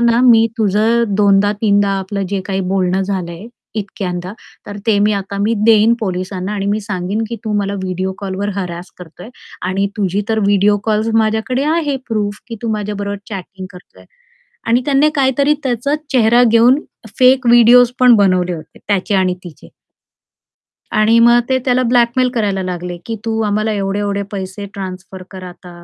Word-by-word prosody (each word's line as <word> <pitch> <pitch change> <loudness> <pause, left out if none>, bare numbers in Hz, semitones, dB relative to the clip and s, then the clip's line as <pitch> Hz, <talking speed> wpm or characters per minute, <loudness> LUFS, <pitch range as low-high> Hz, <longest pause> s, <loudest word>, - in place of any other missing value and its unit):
ना, 235 0 +3
मी 230 -3 +6
तुझं 220 +3 +2
दोनदा, 205 0 +3
तीनदा 205 -2 +2
आपलं 195 0 -4
जे 195 -1 -2
काही 195 -1 -2
बोलणं 190 0 0
झालंय, 185 0 -5 0.3
इतक्यांदा, 185 -2 -5 0.3
तर 205 - -7
ते 215 -3 +3
मी 210 +1 +2
आता 200 0 -4
मी 215 +3 +1
देईन 225 0 +5
पोलिसांना 185 -1 -3
आणि 200 -1 -3
मी 205 +2 0
सांगीन 200 0 -3
की 235 - -5
तू 215 - -2
मला 200 0 -2
व्हिडिओ 185 +1 -3
कॉलवर 200 +1 -4
हॅरॅस 180 -2 -5
करतोय 180 +4 -12 0.4
आणि 195 +1 0
तुझी 200 0 -1
तर 220 - 0
व्हिडिओ 205 +1 +3
कॉल्स 220 0 0
माझ्याकडे 220 +4 0
आहे 295 -5 -1
प्रूफ 210 -2 -2
की 230 - -6
तू 230 - -3
माझ्याबरोबर 205 -1 -4
चॅटिंग 190 -1 -8
करतोय. 180 0 -16 0.6
आणि 235 +2 +3
त्याने 285 +1 +3
काहीतरी 280 +1 +2
त्याचा 260 +2 -1 0.2
चेहरा 240 -1 +4
घेऊन 240 +4 +4 0.4
फेक 255 0 +4
व्हिडिओस 240 +1 +6
पण 250 -1 +6
बनवले 185 -3 +2
होते 155 - -12
त्याचे 205 0 0
आणि 185 -1 +2
तिचे. 170 -4 -12 1.3
आणि 225 +2 +4
मग 240 +1 +6
ते 260 - +2
त्याला 255 -1 +2
ब्लॅकमेल 245 +1 +2
करायला 200 -4 -1
लागले 180 -1 -5
की 225 - -4
तू 225 -1 -1
आम्हाला 215 +1 0
एवढे-एवढे 200 0 -2
पैसे 195 +1 -6
ट्रान्सफर 190 -1 -8
कर 190 -1 -10
आता 180 0 -12
205 Hz, 165 wpm, -16 LUFS, 190-230 Hz, 1.3 s, मी